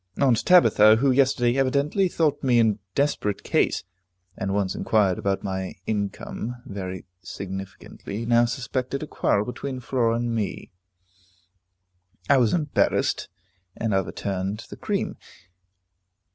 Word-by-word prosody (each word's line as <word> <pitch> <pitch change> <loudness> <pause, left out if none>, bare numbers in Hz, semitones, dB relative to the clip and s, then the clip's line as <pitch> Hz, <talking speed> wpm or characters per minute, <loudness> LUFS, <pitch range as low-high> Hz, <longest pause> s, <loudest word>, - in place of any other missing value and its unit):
Aunt 130 -5 +3
Tabitha, 110 - +6
who 135 +4 +2
yesterday 130 -1 +2
evidently 140 +8 +2
thought 155 -4 0
me 125 -3 +3
in 110 -3 +3 0.2
desperate 140 -8 0
case, - - +1 0.5
and 95 -3 -3
once 100 -2 0
inquired 100 -5 +1
about 100 -1 -1
my 95 -1 -4
income 105 +3 -3
very 95 -2 -6 0.2
significantly, 95 +3 -7
now 120 0 +4
suspected 130 +3 -3
a - - -3
quarrel 105 -7 +1
between 130 +2 -5
Flora 120 -2 0
and 120 0 -1
me. 110 -3 -3 1.6
I 140 - +5
was 120 -4 +3
embarrassed, 155 -4 0 0.5
and 110 -3 -1
overturned 95 +2 -2
the - - -6
cream. - - -3
115 Hz, 120 wpm, -24 LUFS, 100-135 Hz, 1.6 s, Tabitha